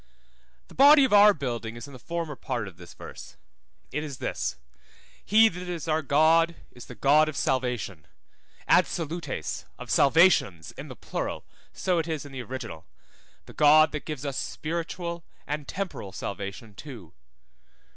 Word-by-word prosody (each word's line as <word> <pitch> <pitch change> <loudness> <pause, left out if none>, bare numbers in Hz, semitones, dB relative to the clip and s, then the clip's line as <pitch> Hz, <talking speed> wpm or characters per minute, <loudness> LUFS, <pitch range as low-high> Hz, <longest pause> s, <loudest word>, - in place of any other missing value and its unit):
The - - -16
body 285 +1 +7
of 255 - -1
our 205 0 +8
building 120 - -4
is 120 - -8
in 140 - -13
the 130 - -11
former 165 -2 -4
part 115 -4 -4
of 90 -3 -12
this 85 -1 -13
verse. 65 - -11 0.5
It 150 +2 -2
is 145 -4 -7
this: - - -3 0.7
He 220 +3 +6
that 180 -2 -6
is 170 -2 -5
our 160 0 +1
God 160 +3 +3 0.2
is 125 - -12
the 125 - -10
God 150 +7 +4
of 155 - -6
salvation; 125 - -2 0.6
ad - - +5
salutes, 160 - -4
of - - -8
salvations 140 - +4
in - - -9
the - - -9
plural, - - -5 0.3
so 180 -2 0
it 165 - -2
is 155 -3 -3
in 145 - -10
the 130 -1 -6
original; 120 -9 -7 0.6
the - - -13
God 155 +1 +6
that 150 - -5
gives 150 -3 -5
us 140 -3 -3
spiritual 170 +1 -4 0.2
and 150 0 -4
temporal 185 - -5
salvation 100 +3 -6
too. 105 - -11
150 Hz, 165 wpm, -27 LUFS, 120-170 Hz, 0.7 s, our